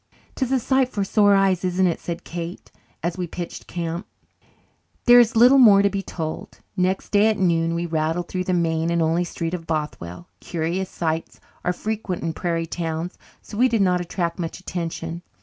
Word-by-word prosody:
"'Tis 260 -2 -2
a 265 - +3
sight 260 +1 +2
for 205 - -2
sore 205 0 +4
eyes, 195 -2 +2
isn't 185 +1 +2
it?" 170 -2 +1
said 170 -1 -5
Kate, 170 +1 -7 0.3
as 170 +2 -2
we 180 - -2
pitched 175 +1 -7
camp. 170 +1 -4 1.0
There 245 0 +9
is 230 -2 +4
little 250 +4 +7
more 205 -5 +7
to 200 - +3
be 195 0 -2
told. 175 +2 -6 0.2
Next 185 0 0
day 205 +1 +4
at 220 -1 +2
noon 165 -2 +1
we 170 +1 -1
rattled 165 +1 -1
through 185 -1 -3
the 185 - 0
main 165 -1 +1
and 170 0 +1
only 165 +2 +2
street 170 -1 -4
of 165 -2 -5
Bothwell. 150 - -4
Curious 175 +3 -2
sights 160 -1 -3 0.2
are 180 - +1
frequent 210 -1 -3
in 165 -1 -1
prairie 165 -1 -1
towns, 165 +1 -4 0.3
so 210 - -8
we 255 +1 +5
did 225 -4 +2
not 180 -1 +2
attract 175 -1 -3
much 165 0 -4
attention. 170 -2 -5
175 Hz, 190 wpm, -23 LUFS, 165-200 Hz, 1.0 s, There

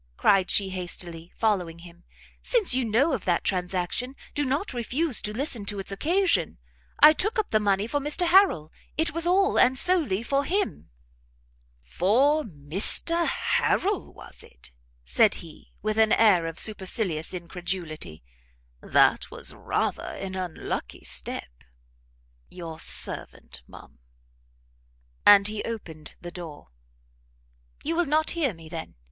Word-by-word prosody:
cried 195 -2 +3
she 195 -2 +2
hastily, 175 -2 -5
following 185 -7 0
him; 170 0 -15 0.4
"since 455 - +2
you 260 0 +1
know 245 +8 +2
of 230 - -3
that 175 -2 0
transaction, 185 +7 -2 0.2
do 290 - -1
not 280 +6 -2
refuse 255 +4 +1
to 210 - -3
listen 240 -1 0
to 205 0 -4
its 195 0 -4
occasion; 305 - 0 0.4
I 310 - +9
took 425 +9 -2
up 435 - -1
the 215 - +3
money 200 -1 +1
for 290 +6 -2
Mr 295 +5 +1
Harrel; 345 - +4 0.3
it 320 -1 +1
was 335 +1 +1
all, 385 +2 +3
and 255 +1 +4
solely 290 - +3
for 275 +3 0
him." 390 +6 -2 0.9
"For 245 - +2
Mr 195 - +3
Harrel, 400 0 0
was - - -12
it?" 60 - -11 0.3
said - - +3
he, - - -13
with 215 +1 -1
an 220 -1 +4
air 190 -7 +4
of 165 - -7
supercilious 190 -6 -1
incredulity; 175 - -6 0.6
"that - - +2
was - - -2
rather - - -2
an 190 -1 -6
unlucky 180 - -5
step. - - -4 0.9
Your 165 -3 -9
servant, 65 - -4
ma'am." - - -15 1.3
And 200 -1 +8
he 215 0 -4
opened 170 -9 -7
the 175 - -8
door. 165 - -10 1.1
"You 325 +3 -1
will 350 +1 +2
not 310 +2 +2
hear 290 - -1
me, 165 -1 -13
then? 160 0 -8
210 Hz, 140 wpm, -25 LUFS, 175-290 Hz, 1.3 s, I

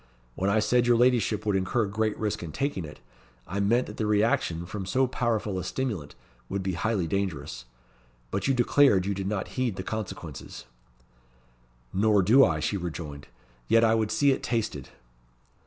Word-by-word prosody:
When 95 +9 -1
I 100 - +2
said 120 +3 +2
your 120 -1 +5
ladyship 115 -4 +2
would 105 -2 +1
incur 95 +5 +1
great 105 +1 -1
risk 105 -2 -2
in 85 -3 -6
taking 135 - -2
it, 75 - -11 0.5
I 100 +4 -4
meant 115 +5 +2
that - - -10
the 110 - -1
reaction 105 -5 +1
from 100 +2 -5
so 130 +7 +2
powerful 115 -6 -1
a - - -4
stimulant 95 - -4 0.3
would 100 -1 -2
be 95 0 -1
highly 100 +1 0
dangerous. 75 -9 -3 0.7
But 100 - -1
you 135 - +2
declared 120 -5 +4
you 100 - 0
did 95 0 -4
not 100 -2 -2
heed 120 -6 0
the 95 - -5
consequences." 90 -9 -6 1.3
"Nor 105 0 +3
do 125 +9 +6
I," 80 -7 +2
she 100 - -1
rejoined. 80 -5 -6 0.4
"Yet 115 0 +4
I 110 -1 +4
would 110 -2 +1
see 140 +4 +3
it 130 - -1
tasted." 110 - -2
105 Hz, 175 wpm, -27 LUFS, 90-115 Hz, 1.3 s, do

